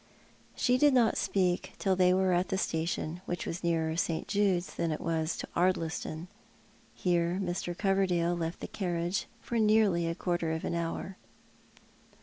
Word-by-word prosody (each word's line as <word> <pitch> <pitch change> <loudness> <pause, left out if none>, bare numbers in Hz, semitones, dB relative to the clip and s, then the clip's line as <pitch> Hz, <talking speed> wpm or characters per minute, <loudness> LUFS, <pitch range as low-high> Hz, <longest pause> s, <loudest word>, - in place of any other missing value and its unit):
She 250 0 +2
did 290 -1 +5
not 235 -3 +4
speak 180 -2 0
till 190 -2 +1
they 180 0 +4
were 185 0 +3
at 175 +1 +1
the 190 - 0
station, 165 -1 -2
which 175 - -3
was 170 +2 -4
nearer 160 -2 +1
St. 165 -1 -1
Jude's 195 -3 +1
than 165 - -1
it 155 - -2
was 160 0 -1
to - - -5
Ardliston. 165 -2 0 0.7
Hero 175 0 +1
Mr. 175 -2 -3
Coverdale 190 -4 +2
left 165 0 -4
the - - -4
carriage 175 -1 -2
for 235 - -2
nearly 210 -6 +3
a 165 - -2
quarter 175 -3 -1
of 160 - -3
an - - -2
hour. 170 +3 -3
175 Hz, 160 wpm, -30 LUFS, 170-190 Hz, 0.7 s, did